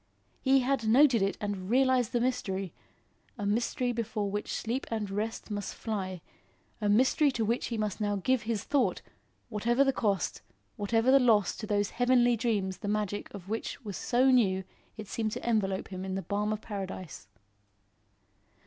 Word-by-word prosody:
He 270 0 +4
had 255 -3 0
noted 250 0 +5
it 195 0 0
and 200 -3 -4
realised 255 -1 +3
the 240 - +1
mystery; 195 -7 -2 0.6
a 205 - -4
mystery 235 +4 0
before 220 -3 -2
which 205 +1 -3
sleep 240 +4 -3
and 215 -3 -3
rest 215 +2 -3
must 205 -1 -4
fly; 190 -5 -4 0.6
a 210 - +1
mystery 260 +7 +4
to 225 -3 0
which 235 +3 0
he 230 - -3
must 215 -1 -2
now 205 -1 +1
give 250 +5 +1
his 220 -2 -2
thought, 280 0 +1 0.5
whatever 235 +4 +2
the 270 -1 +2
cost, 200 -5 -1 0.3
whatever 225 +3 +2
the 275 - +7
loss 220 -6 +3
to 215 - -6
those 205 -1 0
heavenly 245 0 +3
dreams 205 -5 -1
the 205 - -5
magic 205 -1 -2
of 195 -3 -10
which 225 +3 -4
was 200 -3 -5
so 255 +7 +3
new 190 -7 +3 0.3
it 215 -2 -7
seemed 215 0 -2
to - - -6
envelope 200 -5 0
him 185 -1 -6
in 190 0 -3
the 195 - -3
balm 210 +1 -1
of 215 0 -3
Paradise. 190 -4 -6
215 Hz, 175 wpm, -30 LUFS, 200-240 Hz, 0.6 s, the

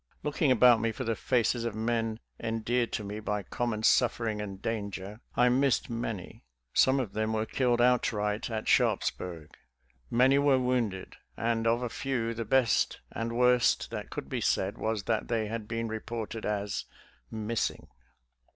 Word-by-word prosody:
Looking 150 -1 +1
about 125 -2 +6
me 115 - +1
for 110 - -5
the 115 0 -1
faces 120 +1 +1
of 115 -2 -3
men 115 0 -1 0.2
endeared 115 +1 -1
to 105 - -2
me 105 +1 -5
by 105 -1 -2
common 110 +2 -3
suffering 115 -3 +2
and 100 -2 -6
danger, 100 -1 -4
I 125 - +4
missed 130 -1 +2
many. 115 -5 -5 0.3
Some 130 +1 +4
of 120 -7 -3
them 110 +1 -1
were 110 0 0
killed 120 +1 +1
outright 110 -4 +1
at 110 -1 -4
Sharpsburg; 85 -4 0 0.6
many 130 +3 +4
were 140 -2 +4
wounded, 125 -7 -1 0.2
and 115 0 0
of 120 +2 +2
a - - 0
few, 120 -3 -2
the 115 0 -4
best 125 -1 +2
and 115 +1 -3
worst 125 -1 +3
that - - -5
could - - -6
be - - -3
said 95 +2 0
was 110 -2 -1
that 110 +1 -1
they 115 -2 0
had 110 0 -5
been 115 0 -2
reported 110 0 -5
as 105 -1 -2 0.3
" - - -35 0.2
missing." 115 - -1
115 Hz, 165 wpm, -29 LUFS, 110-120 Hz, 0.6 s, about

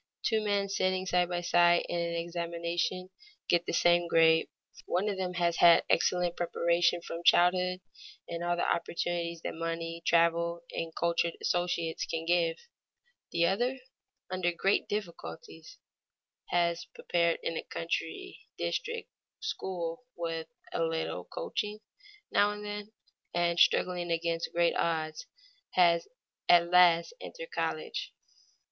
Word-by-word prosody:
Two 220 -2 +1
men 200 -1 +1
sitting 185 -1 0
side 180 -1 +1
by 175 -1 -2
side 175 0 +4
in 175 - -2
an 170 0 -2
examination, 170 +2 -3 0.4
get 175 0 +2
the - - -1
same 175 0 +3
grade; 165 -1 +4 0.4
one 185 +4 0
of 205 - 0
them 180 -1 -3
has 170 -1 +1
had 170 -1 +7
excellent 175 0 +2
preparation 170 0 +1
from 165 - -6
childhood, 180 +1 +4 0.5
and 170 0 -4
all 175 0 +1
the 175 - 0
opportunities 170 -1 -2
that - - -3
money, 165 0 -4
travel, 170 0 +2
and 165 -1 -5
cultured 170 0 0
associates 170 -2 -1
can 165 0 -3
give; 170 -1 +2 0.7
the 170 0 +2
other, 240 +9 +1 0.5
under 185 -1 0
great 195 +3 +1
difficulties, 215 - -6 0.7
has 170 -1 +1
prepared 170 -1 +1
in 165 - -2
a - - -2
country 170 - -4 0.2
district 465 -1 -3 0.3
school 185 - -4
with 165 -1 -4 0.3
a - - -1
little 165 0 -2
coaching 215 - -4 0.5
now 205 0 +4
and 210 0 -7
then, 205 0 -6 0.4
and 170 0 +1
struggling 175 -1 +3
against 165 0 -1
great 170 0 +2
odds, 165 - -1 0.5
has 170 -2 +4 0.4
at 170 0 +6
last 175 - +5
entered - - -8
college. - - -3
175 Hz, 130 wpm, -30 LUFS, 170-185 Hz, 0.7 s, had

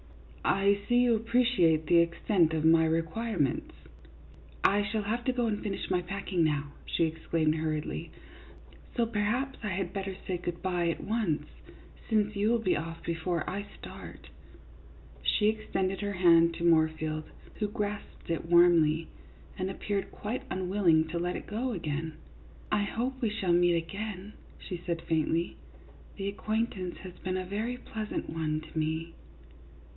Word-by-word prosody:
" - - -19 0.3
I 200 - +1
see 240 - +4
you 245 -1 +4
appreciate 225 -9 +3
the 170 +2 +5
extent 170 0 +2
of 155 0 0
my 160 0 +6
requirements." 165 - -1 0.5
" - - -22
I - - +3
shall 215 +1 -1
have 230 +4 -1
to 255 - +3
go 245 -1 0
and 210 -2 -1
finish 200 -2 -3
my 180 -1 +2
packing 185 -1 -1
now," 145 -2 0 0.2
she - - +1
exclaimed, 160 -1 0
hurriedly, 155 -1 -2 0.4
" - - -21
so 235 - +4
perhaps 235 +5 -1
I 215 - -3
had 185 -2 -2
better 195 -1 -3
say 185 - -1
good 175 0 -5
by 175 -2 +1
at 165 - -3
once, 210 -8 0 0.6
since 215 -1 +2
you 205 +2 +2
will 235 - +4
be 200 -5 +2
off 165 +1 -5
before 170 0 -1
I 200 +1 -3
start." - - -10 0.9
She 210 0 +3
extended 195 -3 -1
her 205 0 -2
hand 170 -2 +5
to - - -5
Moorfield, 155 -2 +2 0.3
who 210 - +1
grasped 210 -1 -5
it 165 0 -2
warmly, 165 -2 +5 0.5
and 185 +1 -1
appeared 200 +1 -2
quite 220 +5 -4
unwilling 180 -5 +3
to 170 +1 -2
let 175 +1 -1
it - - -5
go 235 +4 -2
again. 160 -3 -3 0.3
" - - -22
I - - +1
hope 255 +6 -2
we 230 - +2
shall 195 -4 0
meet 175 0 +5
again," 195 +4 -4 0.2
she 180 -3 -6
said, 170 -2 -2
faintly. 165 +1 0 0.3
" - - -22
The 195 -1 -3
acquaintance 205 -2 -2
has 185 -1 -8
been 185 0 -2
a 185 - -3
very 220 +6 -2
pleasant 220 -7 -4
one 155 -1 -1
to 160 - -11
me." 160 +1 -1
185 Hz, 165 wpm, -30 LUFS, 165-210 Hz, 0.9 s, my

